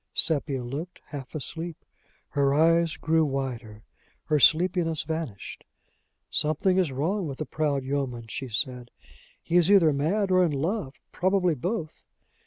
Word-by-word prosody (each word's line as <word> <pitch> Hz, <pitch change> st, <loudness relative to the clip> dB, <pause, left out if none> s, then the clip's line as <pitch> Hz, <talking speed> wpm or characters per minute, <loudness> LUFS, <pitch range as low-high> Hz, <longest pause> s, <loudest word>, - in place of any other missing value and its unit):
Sepia 145 Hz, -5 st, +1 dB
looked, 145 Hz, +9 st, -6 dB
half 140 Hz, -3 st, -8 dB
asleep. 160 Hz, +3 st, -6 dB, 0.4 s
Her 140 Hz, -1 st, +2 dB
eyes 165 Hz, +1 st, +3 dB
grew 160 Hz, +1 st, +2 dB
wider. 125 Hz, -6 st, -4 dB, 0.4 s
Her 150 Hz, -1 st, +1 dB
sleepiness 165 Hz, +1 st, +3 dB
vanished. 160 Hz, -11 st, -5 dB, 0.7 s
"Something 155 Hz, +5 st, +1 dB
is 175 Hz, -6 st, +1 dB
wrong 170 Hz, +8 st, -1 dB
with 135 Hz, -2 st, -6 dB
the 155 Hz, -, -3 dB
proud 145 Hz, -3 st, -1 dB
yeoman!" 130 Hz, -4 st, -3 dB
she 130 Hz, +3 st, -5 dB
said. 125 Hz, +1 st, -3 dB, 0.5 s
"He 170 Hz, -, +1 dB
is 175 Hz, 0 st, +4 dB
either 170 Hz, -7 st, +6 dB
mad 185 Hz, +8 st, 0 dB
or 185 Hz, 0 st, +5 dB
in 165 Hz, -4 st, +1 dB
love, 155 Hz, +1 st, -2 dB, 0.2 s
probably 185 Hz, -2 st, +2 dB
both! 165 Hz, -, -4 dB
155 Hz, 140 wpm, -26 LUFS, 135-170 Hz, 0.7 s, either